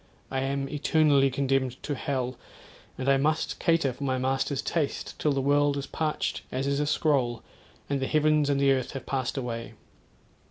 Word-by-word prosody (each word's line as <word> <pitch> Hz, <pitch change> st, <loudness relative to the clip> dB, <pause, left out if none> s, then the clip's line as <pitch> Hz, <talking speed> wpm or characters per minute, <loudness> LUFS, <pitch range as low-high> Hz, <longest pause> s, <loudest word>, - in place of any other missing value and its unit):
I 135 Hz, -, 0 dB
am 135 Hz, +1 st, -1 dB
eternally 145 Hz, -1 st, +3 dB
condemned 135 Hz, -1 st, 0 dB
to 145 Hz, -, -2 dB
hell 130 Hz, -2 st, -2 dB, 0.6 s
and 130 Hz, -, -4 dB
I 135 Hz, 0 st, +5 dB
must 155 Hz, +3 st, 0 dB
cater 165 Hz, -6 st, +2 dB
for 140 Hz, -, -8 dB
my 130 Hz, -1 st, 0 dB
master's 135 Hz, +1 st, 0 dB
taste 155 Hz, -5 st, -2 dB
till 150 Hz, -, +2 dB
the 135 Hz, -1 st, 0 dB
world 145 Hz, +1 st, +3 dB
is 140 Hz, -, -3 dB
parched 155 Hz, -1 st, -2 dB
as 130 Hz, +1 st, -2 dB
is 140 Hz, 0 st, 0 dB
a 150 Hz, -, 0 dB
scroll, 135 Hz, -6 st, +1 dB, 0.4 s
and 140 Hz, -1 st, -1 dB
the 135 Hz, -, -1 dB
heavens 155 Hz, -1 st, +3 dB
and 140 Hz, -1 st, +2 dB
the 140 Hz, 0 st, +4 dB
earth 130 Hz, -2 st, 0 dB
have 135 Hz, -, -6 dB
passed 130 Hz, -1 st, -2 dB
away. 115 Hz, -3 st, -4 dB
140 Hz, 185 wpm, -27 LUFS, 130-145 Hz, 0.6 s, I